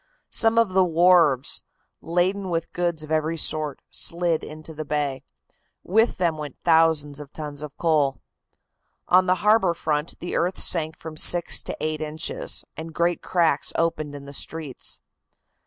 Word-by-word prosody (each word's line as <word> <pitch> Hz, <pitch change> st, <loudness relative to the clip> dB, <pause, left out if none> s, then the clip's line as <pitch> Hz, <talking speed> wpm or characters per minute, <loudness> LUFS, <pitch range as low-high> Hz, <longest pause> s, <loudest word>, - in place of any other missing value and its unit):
Some 225 Hz, 0 st, +3 dB
of 230 Hz, -3 st, +4 dB
the 190 Hz, 0 st, +5 dB
wharves, 170 Hz, -6 st, +3 dB, 0.4 s
laden 185 Hz, +3 st, 0 dB
with 165 Hz, -1 st, -3 dB
goods 170 Hz, -3 st, -1 dB
of 155 Hz, -, -10 dB
every 160 Hz, +1 st, 0 dB
sort, 155 Hz, -3 st, +4 dB
slid 170 Hz, -1 st, -1 dB
into 155 Hz, +1 st, -9 dB
the 155 Hz, 0 st, -5 dB
bay. 145 Hz, -3 st, -2 dB, 0.6 s
With 220 Hz, +6 st, +2 dB
them 170 Hz, -4 st, 0 dB
went 145 Hz, -3 st, -7 dB
thousands 160 Hz, -3 st, +3 dB
of 145 Hz, -1 st, -10 dB
tons 150 Hz, -2 st, -6 dB
of 150 Hz, -1 st, -8 dB
coal. 150 Hz, -5 st, +1 dB, 0.9 s
On 185 Hz, +1 st, +5 dB
the 185 Hz, -, +4 dB
harbor 210 Hz, -5 st, +4 dB
front 150 Hz, 0 st, -2 dB
the 175 Hz, -, -5 dB
earth 180 Hz, +3 st, 0 dB
sank 160 Hz, -2 st, +1 dB
from 160 Hz, -1 st, -9 dB
six 175 Hz, +2 st, +3 dB
to -, -, -6 dB
eight 155 Hz, 0 st, -3 dB
inches, 155 Hz, +1 st, -2 dB
and 160 Hz, 0 st, -8 dB
great 170 Hz, 0 st, 0 dB
cracks 165 Hz, -5 st, +1 dB
opened 155 Hz, -3 st, -1 dB
in 140 Hz, -1 st, -9 dB
the 140 Hz, -, -9 dB
streets. 150 Hz, -2 st, -4 dB
160 Hz, 155 wpm, -24 LUFS, 150-175 Hz, 0.9 s, the